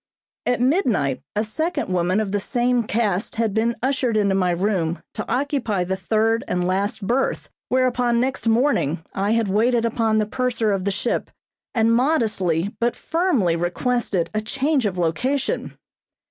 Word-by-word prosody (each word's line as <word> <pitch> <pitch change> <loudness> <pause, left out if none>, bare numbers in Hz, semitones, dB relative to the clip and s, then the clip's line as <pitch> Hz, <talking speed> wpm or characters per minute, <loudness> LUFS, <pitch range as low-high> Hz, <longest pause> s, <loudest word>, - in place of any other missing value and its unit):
At 245 - +2
midnight 240 - +1
a 210 - +1
second 315 - -2
woman 180 +3 +1
of 210 -3 -2
the 205 - +1
same 240 +2 +1
caste 210 -3 0
had 225 -3 0
been 230 +2 +1
ushered 260 -4 +1
into 200 -2 +2
my 185 -2 +2
room 175 -2 0
to - - -5
occupy 250 -8 0
the 190 +2 -2
third 220 +4 +1
and 180 0 0
last 195 +3 -1
berth, 250 +6 0 0.2
whereupon 250 -2 +2
next 260 -1 -1
morning 225 - +2
I 200 +3 0
had 230 -2 +1
waited 230 +4 +2
upon 225 -1 +1
the 215 - +2
purser 235 -1 0
of 195 -2 -1
the - - +2
ship, 205 +4 -2 0.5
and 225 0 +3
modestly 215 - +1
but 235 0 +1
firmly 320 - +1
requested 180 +2 -1
a 215 - 0
change 270 +3 0
of 185 -2 -4
location. 250 - -1
220 Hz, 160 wpm, -22 LUFS, 195-250 Hz, 0.5 s, and